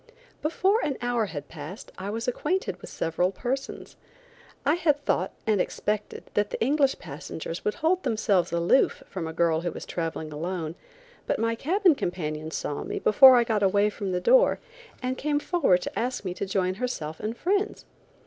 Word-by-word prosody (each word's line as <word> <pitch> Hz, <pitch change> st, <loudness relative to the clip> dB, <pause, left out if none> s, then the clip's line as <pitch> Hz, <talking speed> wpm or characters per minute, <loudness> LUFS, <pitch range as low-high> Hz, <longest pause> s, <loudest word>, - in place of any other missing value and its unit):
Before 380 Hz, +8 st, +2 dB
an 275 Hz, -, -1 dB
hour 240 Hz, -3 st, 0 dB
had 145 Hz, -5 st, -6 dB
passed 190 Hz, -, -9 dB
I 190 Hz, +2 st, -5 dB
was 225 Hz, +3 st, -3 dB
acquainted 320 Hz, +10 st, -1 dB
with -, -, -9 dB
several 175 Hz, +3 st, 0 dB
persons. 260 Hz, +7 st, -4 dB, 0.7 s
I 290 Hz, -, +4 dB
had 300 Hz, -4 st, +1 dB
thought -, -, +1 dB
and 210 Hz, -4 st, +3 dB
expected 210 Hz, 0 st, -3 dB
that 205 Hz, 0 st, +1 dB
the -, -, -4 dB
English 275 Hz, +2 st, +2 dB
passengers 160 Hz, +2 st, -7 dB
would 210 Hz, -, 0 dB
hold 355 Hz, +4 st, +1 dB
themselves 215 Hz, -, +1 dB
aloof 170 Hz, +9 st, +2 dB
from 175 Hz, -4 st, -5 dB
a -, -, -4 dB
girl 165 Hz, -1 st, +2 dB
who 175 Hz, 0 st, -2 dB
was -, -, -8 dB
traveling 160 Hz, -2 st, -4 dB
alone, 165 Hz, +1 st, -3 dB, 0.5 s
but -, -, +1 dB
my 230 Hz, +1 st, +1 dB
cabin 355 Hz, -, +3 dB
companion 155 Hz, -, -3 dB
saw 150 Hz, -2 st, -3 dB
me -, -, -4 dB
before 260 Hz, +4 st, +8 dB
I 240 Hz, -, +5 dB
got 220 Hz, -3 st, 0 dB
away 200 Hz, +1 st, +3 dB
from 200 Hz, -3 st, -4 dB
the 180 Hz, -, 0 dB
door, -, -, +5 dB, 0.5 s
and 255 Hz, +1 st, -2 dB
came 295 Hz, 0 st, +1 dB
forward 290 Hz, -, +2 dB
to -, -, -4 dB
ask 245 Hz, -2 st, -2 dB
me 180 Hz, -, -2 dB
to 195 Hz, -, -4 dB
join 185 Hz, -1 st, 0 dB
herself 160 Hz, -11 st, -3 dB
and 220 Hz, +2 st, -4 dB
friends. 400 Hz, +3 st, -1 dB
210 Hz, 180 wpm, -26 LUFS, 175-275 Hz, 0.7 s, before